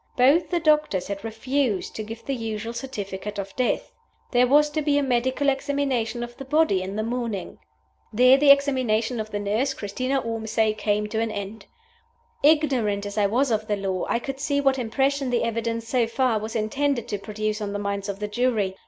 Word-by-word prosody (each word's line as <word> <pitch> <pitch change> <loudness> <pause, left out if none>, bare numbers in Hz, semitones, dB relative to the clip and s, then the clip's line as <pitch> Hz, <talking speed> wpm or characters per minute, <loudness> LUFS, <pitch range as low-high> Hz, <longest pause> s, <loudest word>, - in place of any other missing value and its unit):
Both 275 +7 +4
the 350 - +1
doctors 300 - +2
had 200 0 -4
refused 225 -1 -1
to - - -4
give 225 +2 -8
the 275 - -1
usual 225 -2 -4
certificate 210 -5 -5
of 195 -1 -5
death! 255 -1 -1 0.4
There 250 0 +4
was 295 +3 +4
to 310 - -1
be 290 -1 +2
a 285 - +2
medical 260 +2 0
examination 270 -4 0
of 240 0 -8
the - - -7
body 285 -7 +2
the 185 - -4
next 215 +3 -3
morning." 235 -5 -4 0.5
There 250 +4 +6
the 285 +1 +4
examination 255 -5 +3
of 215 0 -4
the 205 - -3
nurse, 220 +7 0
Christina 255 +6 -2
Ormsay, 220 -2 0
came 210 -1 0
to 220 - -2
an 225 0 0
end. 205 0 -6 0.7
Ignorant 265 -10 +2
as 205 0 -5
I 205 -2 +3
was 250 +5 +1
of 215 -1 0
the 210 -2 0
law, 190 -2 -2
I - - +2
could 270 +3 -5
see 285 0 0
what 270 -1 +2
impression 270 +3 0
the 245 -1 +1
evidence 230 0 -2
(so 240 -1 +1
far) 230 -1 +1
was 220 +2 -6
intended 240 +3 0
to 205 - -2
produce 215 +1 -3
on 205 -1 -3
the 205 - -2
minds 200 0 -3
of 200 - -3
the 210 +1 -3
jury. 210 -4 0
230 Hz, 200 wpm, -24 LUFS, 210-270 Hz, 0.7 s, There